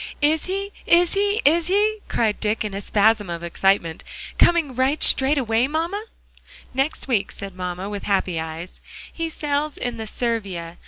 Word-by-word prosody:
"Is 305 +1 +3
he 395 +2 -3 0.2
is 345 0 +5
he 405 +2 +1
is 325 +3 +4
he?" 420 +3 +2
cried 220 -3 0
Dick 215 0 -1
in 210 - -4
a 200 - -4
spasm 210 -1 +2
of 170 0 -5
excitement, 170 -1 +1 0.4
"coming 335 -6 +4
right 260 +4 +1
straight 275 +3 +5
away, 235 -1 +2
mamma?" 335 +8 -2 0.7
"Next 270 +3 -1
week," 230 -7 0
said 195 -1 -8
mamma, 180 +1 -5
with 205 -1 -5
happy 190 -4 0
eyes, 160 +2 -7 0.3
"he 330 -1 -3
sails 295 -1 -2
in 245 -1 -3
the 220 -1 -5
Servia. 200 -8 -3
235 Hz, 165 wpm, -22 LUFS, 195-315 Hz, 0.7 s, is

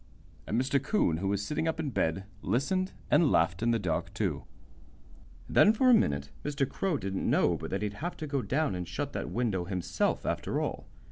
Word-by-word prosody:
And 110 - +1
Mr. 135 +1 +1
'Coon, 135 - +2
who 95 +4 -2
was 100 +1 0
sitting 155 +5 -1
up 160 0 -1
in 150 -4 -2
bed, 90 -3 0 0.2
listened 185 - 0 0.2
and 160 -5 +5
laughed 85 +2 +2
in 115 - +2
the 115 - +3
dark, 90 -7 -2
too. - - -1 1.0
Then 210 - +5
for 255 +3 +4
a - - +8
minute 70 - +2
Mr. 145 -2 0
Crow 185 0 -1
didn't 95 -4 -2
know - - +3
but - - -6
that 95 +2 -2
he'd 105 -1 -2
have 175 +2 -3
to 155 - -4
go 140 -2 -1
down 140 +6 0
and 90 -1 -4
shut 145 -1 -4
that - - -3
window 105 -7 -1
himself, 90 -2 -1
after - - -1
all. - - -3
120 Hz, 205 wpm, -30 LUFS, 95-155 Hz, 1.0 s, a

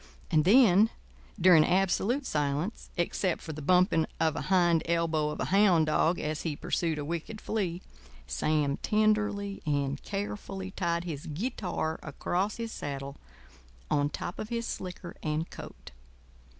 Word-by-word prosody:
And 155 -1 +3
then, 215 -1 +6 0.5
during 175 -3 +7
absolute 195 - +1
silence, 150 - -2
except 175 +1 0
for 160 - -7
the 155 - -7
bumping 180 +1 +3
of 160 -1 +2
a - - -2
hind 175 -3 +4
elbow 165 -3 +1
of 150 - -5
a - - 0
hound 190 -6 +5
dog 160 +3 +2
as 155 -1 -2
he 160 -3 -2
pursued 165 +1 -1
a 145 - -3
wicked 170 +7 -4
flea, 185 -6 -2 0.4
Sam 140 - 0
tenderly 210 -2 +1
and 140 -2 -1
carefully 195 -1 -5
tied 170 -3 -1
his 155 -5 -6
guitar 175 - -3
across 180 - -2
his 230 -1 -4
saddle 140 -4 -5 0.7
on 145 0 +2
top 175 - -5
of 215 - -5
his 235 -1 -2
slicker 180 -3 -6
and 155 +1 -1
coat. - - -10
170 Hz, 145 wpm, -29 LUFS, 155-200 Hz, 0.7 s, during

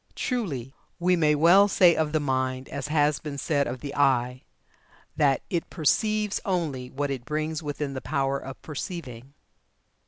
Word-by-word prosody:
Truly, 145 - -3 0.2
we 180 +1 +2
may 155 -3 +3
well 175 +7 +6
say 180 -4 +5
of 155 -1 0
the 155 - +1
mind, 130 -2 -1
as 140 0 -4
has 150 -1 +2
been 145 -2 -6
said 140 -1 0
of 125 0 -5
the 140 -1 -6
eye, 130 -2 +2 0.7
that 145 -4 +2
'it 170 -2 -2
perceives 210 +6 +1
only 155 -10 -2
what 140 +2 -3
it 130 -3 -4
brings 155 +3 -2
within 145 -2 -4
the 130 - -5
power 135 0 -1
of 135 - -9
perceiving.'" 140 -4 -7
145 Hz, 160 wpm, -26 LUFS, 135-160 Hz, 0.7 s, well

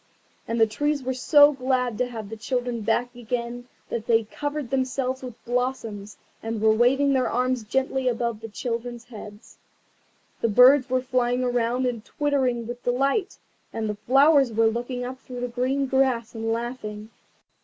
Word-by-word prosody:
And 230 0 -2
the 225 - +7
trees 290 +6 -1
were 260 +1 -1
so 290 +3 +6
glad 255 -3 -1
to 250 - +1
have 220 -4 -7
the 225 - -6
children 245 +1 -2
back 240 +3 0
again 245 0 -4 0.2
that 230 -1 -4
they 230 - +5
had 220 -1 -8
covered 290 -3 -4
themselves 260 0 -1
with 250 -3 -8
blossoms, 235 -4 -3 0.2
and 225 0 -3
were 220 0 +4
waving 270 +5 +3
their 260 -2 +1
arms 250 0 0
gently 265 +3 -1
above 235 -2 -1
the 225 - -6
children's 235 +1 -5
heads. 210 -2 -12 0.8
The - - +2
birds 255 +4 +6
were 255 0 +1
flying 250 -1 0
about 245 +1 0
and 235 -3 -2
twittering 265 -6 -1
with 240 +1 -7
delight, 275 - 0 0.3
and 225 -1 -3
the 210 - -1
flowers 270 +5 +4
were 225 +1 +2
looking 245 +2 -1
up 255 +1 -7
through 250 -2 -8
the 245 - -1
green 255 +3 -1
grass 260 -3 +1
and 225 0 -3
laughing. 225 -2 -5
245 Hz, 170 wpm, -25 LUFS, 230-260 Hz, 0.8 s, the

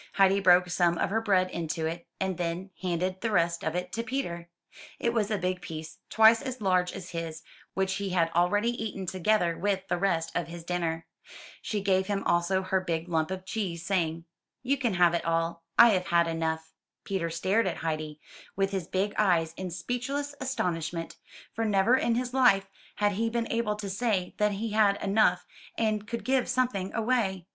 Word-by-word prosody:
Heidi 195 0 +4
broke 180 -2 +5
some 175 -1 +2
of 175 - 0
her 225 +2 +1
bread 185 -4 +2
into 165 -1 -3
it, 170 +1 -4
and 190 -2 -2
then 175 +3 -3
handed 185 +1 -1
the 230 - 0
rest 170 -4 +1
of 160 +1 -2
it 180 0 -3
to 230 - -1
Peter. 205 -10 -4 0.5
It 235 - 0
was 215 -3 +1
a 215 - 0
big 180 0 -2
piece, 160 -1 -8
twice 220 +1 +6
as 260 -2 -5
large 185 -3 +2
as 180 - -8
his, 165 -1 -5 0.3
which 190 0 0
he 200 0 -3
had 170 -3 +1
already 205 +7 +2
eaten, 195 -3 -4
together 185 -1 +1
with 195 0 -1
the 175 - 0
rest 170 -4 0
of 175 -2 -1
his 170 0 -8
dinner. 165 -2 -2 0.6
She 210 -2 -2
gave 190 -1 +2
him 200 -1 -1
also 175 +2 +1
her 190 0 0
big 170 -1 -3
lump 160 -1 0
of 190 0 -5
cheese, 180 -6 -3
saying, 165 -3 -1 0.4
*'You 270 +2 +2
can 245 -7 -1
have 175 -1 +4
it 170 - 0
all, 165 0 -1
I 235 - +9
have 185 -4 +1
had 170 0 +3
enough.'' 160 -1 -2 0.3
Peter 185 -4 -2
stared 190 +7 +1
at - - -2
Heidi, 155 -1 -3 0.4
with 195 0 0
his 190 -4 -3
big 200 +2 -1
eyes, 170 -6 +2
in 185 -1 -5
speechless 250 - -3
astonishment; 170 -10 -2 0.4
for 225 - -2
never 210 +3 +3
in 235 -3 +1
his 250 +1 -2
life 245 -7 +4 0.3
had 205 0 +2
he 225 +3 0
been 230 0 -1
able 230 -2 0
to 210 -1 -6
say 195 -2 -1
that 210 0 +2
he 215 +3 -3
had 205 -2 +3
had - - -5
enough 195 -3 +3 0.3
and 215 -2 0
could 235 +1 -5
give 260 -1 +1
something 245 -7 0
away. 215 -6 0
190 Hz, 195 wpm, -28 LUFS, 170-215 Hz, 0.6 s, I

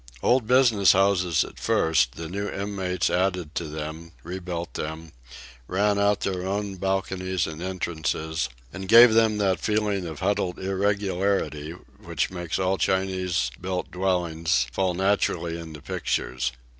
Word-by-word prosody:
Old 125 -3 +3
business 120 -6 +5
houses 90 -4 +3
at - - -11
first, 65 -7 +2
the 80 0 -6
new 100 +4 -3
inmates 95 -2 -2
added 90 -3 0
to 85 - -2
them, 80 +2 -7
rebuilt 85 -1 -5
them, 80 +1 -5 0.6
ran 100 +2 +1
out 100 0 +2
their 90 -2 -2
own 100 0 -3
balconies 95 -1 -1
and 80 0 -7
entrances, 80 -4 -2 0.2
and 95 0 -6
gave 115 +2 +9
them 110 -1 +4
that 95 -4 +1
feeling 105 -2 0
of 80 -3 -7
huddled 95 -2 0
irregularity 95 -5 -1 0.3
which - - -1
makes 90 -3 -3
all 95 0 0
Chinese 95 -8 0
built 90 -1 -3
dwellings 90 -5 0
fall 90 +6 0
naturally 95 -3 0
into 80 -3 -9
pictures. 65 -7 -2
95 Hz, 135 wpm, -25 LUFS, 85-100 Hz, 0.6 s, gave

